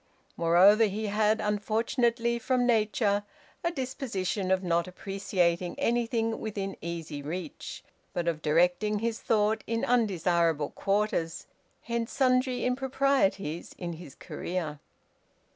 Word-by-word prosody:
Moreover, 185 Hz, +6 st, +6 dB
he 215 Hz, +1 st, -2 dB
had 215 Hz, +1 st, +2 dB
unfortunately 230 Hz, +3 st, 0 dB
from 250 Hz, +1 st, +1 dB
nature 215 Hz, -3 st, +2 dB, 0.4 s
a 340 Hz, -, +2 dB
disposition 245 Hz, -, -3 dB
of 190 Hz, 0 st, +2 dB
not 170 Hz, -1 st, +1 dB
appreciating 180 Hz, -2 st, -1 dB
anything 230 Hz, -1 st, 0 dB
within 200 Hz, -3 st, -4 dB
easy 165 Hz, -3 st, -5 dB
reach, 160 Hz, +2 st, -6 dB, 0.3 s
but 175 Hz, -1 st, -2 dB
of 160 Hz, -2 st, -1 dB
directing 180 Hz, +7 st, +2 dB
his 225 Hz, +1 st, -2 dB
thought 215 Hz, 0 st, +1 dB
in 230 Hz, 0 st, 0 dB
undesirable 170 Hz, -9 st, +2 dB
quarters, 195 Hz, -5 st, -1 dB, 0.4 s
hence 235 Hz, 0 st, -2 dB
sundry 255 Hz, -1 st, +2 dB
improprieties 250 Hz, -, 0 dB
in 175 Hz, -2 st, -4 dB
his 160 Hz, -4 st, -11 dB
career. 165 Hz, -5 st, -4 dB
205 Hz, 110 wpm, -29 LUFS, 175-230 Hz, 0.4 s, Moreover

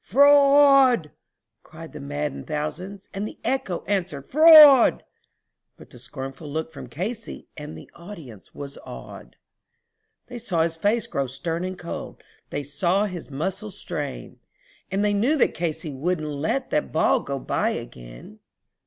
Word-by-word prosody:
"Fraud!" 275 Hz, -, +5 dB, 0.6 s
yelled -, -, -10 dB
the -, -, -9 dB
maddened 70 Hz, -1 st, -5 dB
thousands, 180 Hz, +7 st, -5 dB
and 200 Hz, +2 st, -3 dB
the -, -, -11 dB
echo 260 Hz, -10 st, -2 dB
answered 180 Hz, -8 st, -3 dB
"Fraud," 305 Hz, -3 st, +8 dB, 0.7 s
But -, -, -16 dB
one 125 Hz, -, -13 dB
scornful 135 Hz, +4 st, -8 dB
look 160 Hz, +2 st, -4 dB
from 130 Hz, -, -10 dB
Casey 210 Hz, -, -6 dB
and 150 Hz, 0 st, -8 dB
the -, -, -12 dB
audience 165 Hz, -, -12 dB
was 140 Hz, -1 st, -8 dB
awed; -, -, -11 dB, 0.9 s
They 245 Hz, -1 st, -9 dB
saw 175 Hz, -8 st, 0 dB
his 165 Hz, 0 st, -2 dB
face 205 Hz, +7 st, 0 dB
grow 140 Hz, -1 st, -3 dB
stern 165 Hz, +6 st, -4 dB
and 185 Hz, 0 st, -5 dB
cold; 170 Hz, -, -8 dB, 0.3 s
they 145 Hz, -, -4 dB
saw 175 Hz, +8 st, 0 dB
his 180 Hz, -6 st, -7 dB
muscles 190 Hz, +8 st, -4 dB
strain, 145 Hz, -6 st, -6 dB, 0.5 s
And 200 Hz, +2 st, 0 dB
they 205 Hz, -, +1 dB
knew 245 Hz, +10 st, +1 dB
that -, -, +2 dB
Casey 160 Hz, -1 st, -4 dB
would 160 Hz, +6 st, -2 dB
not 155 Hz, -1 st, -5 dB
let 160 Hz, -, -2 dB
that 150 Hz, -, -1 dB
ball 160 Hz, -, +2 dB
go 140 Hz, 0 st, -5 dB
by -, -, -1 dB
again. -, -, -9 dB
170 Hz, 150 wpm, -24 LUFS, 145-210 Hz, 0.9 s, Fraud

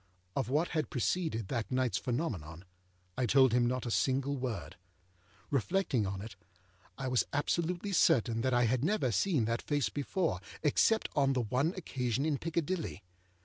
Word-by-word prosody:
Of -, -, -1 dB
what 155 Hz, +6 st, +1 dB
had 155 Hz, -5 st, -1 dB
preceded 125 Hz, -, -1 dB
that 120 Hz, -4 st, -2 dB
nightâs 130 Hz, -6 st, +1 dB
phenomenon, 100 Hz, -, -3 dB, 0.5 s
I 125 Hz, -, +2 dB
told 130 Hz, 0 st, +5 dB
him 120 Hz, -1 st, +3 dB
not 125 Hz, 0 st, -1 dB
a 120 Hz, -, -2 dB
single 135 Hz, +3 st, +1 dB
word. 105 Hz, -, -4 dB, 0.8 s
Reflecting 140 Hz, -, +1 dB
on 95 Hz, 0 st, -4 dB
it, 110 Hz, -3 st, -9 dB, 0.6 s
I 135 Hz, 0 st, -3 dB
was 125 Hz, -1 st, +1 dB
absolutely 170 Hz, +6 st, -1 dB
certain 115 Hz, -, +3 dB
that 130 Hz, -, +1 dB
I 120 Hz, 0 st, +3 dB
had 120 Hz, +2 st, +1 dB
never 170 Hz, -, +1 dB
seen 130 Hz, -, +2 dB
that 115 Hz, +1 st, -1 dB
face 145 Hz, -4 st, 0 dB
before, 150 Hz, -, -1 dB, 0.2 s
except 220 Hz, +9 st, +3 dB
on 135 Hz, -2 st, +3 dB
the 130 Hz, -, +1 dB
one 130 Hz, -, 0 dB
occasion 130 Hz, -5 st, -1 dB
in 150 Hz, -4 st, 0 dB
Piccadilly. 165 Hz, -, -2 dB
130 Hz, 160 wpm, -32 LUFS, 115-155 Hz, 0.8 s, told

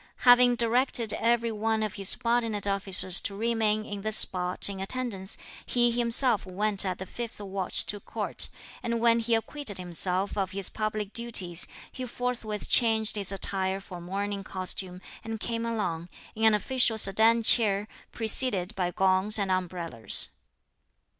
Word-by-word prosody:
Having 245 Hz, 0 st, +5 dB
directed 235 Hz, -1 st, +2 dB
every 235 Hz, 0 st, 0 dB
one 220 Hz, 0 st, -1 dB
of 210 Hz, -2 st, -4 dB
his 195 Hz, -2 st, -1 dB
subordinate 230 Hz, -4 st, 0 dB
officers 195 Hz, -2 st, +2 dB
to 200 Hz, -, -4 dB
remain 220 Hz, -1 st, 0 dB
in 205 Hz, -2 st, -7 dB
this 215 Hz, +1 st, +2 dB
spot 180 Hz, 0 st, +2 dB
in 200 Hz, -1 st, -5 dB
attendance, 195 Hz, -2 st, +1 dB, 0.3 s
he 240 Hz, -1 st, +1 dB
himself 235 Hz, 0 st, +4 dB
went 200 Hz, +2 st, +1 dB
at 185 Hz, -2 st, -3 dB
the 190 Hz, -, -7 dB
fifth 235 Hz, +3 st, -7 dB
watch 195 Hz, -2 st, -1 dB
to 205 Hz, -, -4 dB
court, -, -, -5 dB, 0.3 s
and 235 Hz, 0 st, -2 dB
when 230 Hz, 0 st, +3 dB
he 230 Hz, 0 st, +1 dB
acquitted 225 Hz, -1 st, -3 dB
himself 180 Hz, +2 st, -2 dB
of 195 Hz, -3 st, -2 dB
his 195 Hz, -1 st, -1 dB
public 215 Hz, -1 st, -4 dB
duties 190 Hz, -8 st, +1 dB, 0.2 s
he 255 Hz, -, -7 dB
forthwith 235 Hz, -3 st, -4 dB
changed 220 Hz, -3 st, +3 dB
his 200 Hz, -2 st, +3 dB
attire 195 Hz, -1 st, -1 dB
for 185 Hz, -2 st, -10 dB
a -, -, -12 dB
mourning 200 Hz, +2 st, -4 dB
costume, 185 Hz, -1 st, -2 dB, 0.2 s
and 225 Hz, -1 st, -6 dB
came 230 Hz, +1 st, -3 dB
along, 180 Hz, -7 st, -4 dB, 0.2 s
in 220 Hz, +1 st, -1 dB
an 220 Hz, -1 st, +5 dB
official 245 Hz, +1 st, +1 dB
sedan 220 Hz, +3 st, +3 dB
chair, 210 Hz, -3 st, +3 dB, 0.2 s
preceded 220 Hz, -4 st, 0 dB
by 180 Hz, -2 st, -1 dB
gongs 190 Hz, +3 st, +2 dB
and 200 Hz, -2 st, -1 dB
umbrellas. 175 Hz, -9 st, -1 dB
210 Hz, 155 wpm, -27 LUFS, 190-230 Hz, 0.3 s, Having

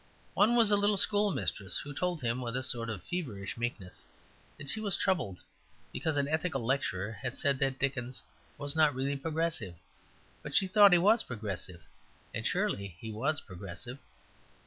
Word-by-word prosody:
One 220 Hz, +4 st, +4 dB
was 230 Hz, -3 st, +5 dB
a -, -, +7 dB
little 205 Hz, 0 st, +3 dB
schoolmistress 205 Hz, -, +1 dB
who 145 Hz, 0 st, -5 dB
told 175 Hz, 0 st, -2 dB
him 120 Hz, +2 st, 0 dB
with 120 Hz, 0 st, -2 dB
a 130 Hz, -, -2 dB
sort 115 Hz, -2 st, -2 dB
of 105 Hz, -5 st, -5 dB
feverish 120 Hz, -, -4 dB
meekness 115 Hz, -6 st, -4 dB, 0.5 s
that 145 Hz, -, -9 dB
she 215 Hz, -, -1 dB
was 205 Hz, -4 st, 0 dB
troubled 160 Hz, -, 0 dB, 0.5 s
because 160 Hz, -2 st, -1 dB
an 140 Hz, -1 st, +2 dB
Ethical 155 Hz, -5 st, -1 dB
Lecturer 105 Hz, -6 st, 0 dB
had 125 Hz, -1 st, -2 dB
said 140 Hz, -3 st, +2 dB
that 135 Hz, -1 st, +1 dB
Dickens 130 Hz, -2 st, -2 dB, 0.3 s
was 145 Hz, +1 st, -2 dB
not 155 Hz, -4 st, +4 dB
really 135 Hz, +2 st, 0 dB
Progressive; 155 Hz, -, -2 dB, 0.7 s
but -, -, -6 dB
she 195 Hz, -, +5 dB
thought 200 Hz, +1 st, +7 dB
he 175 Hz, -, +7 dB
was 210 Hz, +6 st, +5 dB
Progressive; 100 Hz, -6 st, -6 dB, 0.5 s
and -, -, -1 dB
surely 100 Hz, -3 st, -1 dB
he 110 Hz, -, -6 dB
was 140 Hz, +8 st, 0 dB
Progressive. 100 Hz, +7 st, -7 dB
135 Hz, 170 wpm, -31 LUFS, 110-175 Hz, 0.7 s, a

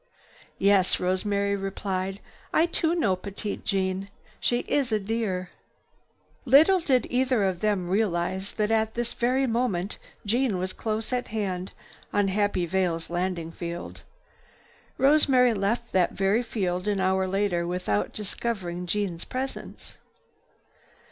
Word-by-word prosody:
"Yes," 195 Hz, -2 st, +4 dB
Rosemary 200 Hz, +2 st, 0 dB
replied, 195 Hz, 0 st, -3 dB, 0.3 s
"I 320 Hz, -, +4 dB
too 335 Hz, -1 st, 0 dB
know 205 Hz, -, +2 dB
Petite 200 Hz, +2 st, -5 dB
Jeanne. 190 Hz, 0 st, -1 dB, 0.3 s
She 240 Hz, 0 st, +1 dB
is 275 Hz, -5 st, 0 dB
a 215 Hz, -, +2 dB
dear!" 195 Hz, -4 st, -2 dB, 0.9 s
Little 305 Hz, +9 st, +6 dB
did 260 Hz, -7 st, +2 dB
either 255 Hz, -3 st, +2 dB
of 190 Hz, -3 st, 0 dB
them 205 Hz, -4 st, 0 dB
realize 190 Hz, -1 st, 0 dB
that 210 Hz, 0 st, 0 dB
at 220 Hz, 0 st, +1 dB
this 240 Hz, 0 st, -2 dB
very 255 Hz, +3 st, +1 dB
moment 225 Hz, -6 st, -1 dB, 0.3 s
Jeanne 230 Hz, -1 st, +1 dB
was 185 Hz, +1 st, -2 dB
close 220 Hz, +2 st, -3 dB
at 250 Hz, 0 st, -1 dB
hand, 190 Hz, -4 st, -3 dB, 0.4 s
on 205 Hz, -1 st, +2 dB
Happy 205 Hz, -2 st, +1 dB
Vale's 170 Hz, -2 st, -1 dB
landing 175 Hz, -2 st, -2 dB
field. 170 Hz, 0 st, -6 dB, 1.0 s
Rosemary 270 Hz, -3 st, +5 dB
left 225 Hz, +4 st, -1 dB
that 185 Hz, -2 st, +2 dB
very 195 Hz, +4 st, +2 dB
field 185 Hz, -5 st, -2 dB
an 205 Hz, -2 st, +1 dB
hour 190 Hz, 0 st, +2 dB
later 185 Hz, -3 st, 0 dB
without 175 Hz, -, -1 dB
discovering 190 Hz, -4 st, -3 dB
Jeanne's 180 Hz, -3 st, -1 dB
presence. 265 Hz, +1 st, -6 dB
200 Hz, 130 wpm, -26 LUFS, 185-235 Hz, 1.0 s, Little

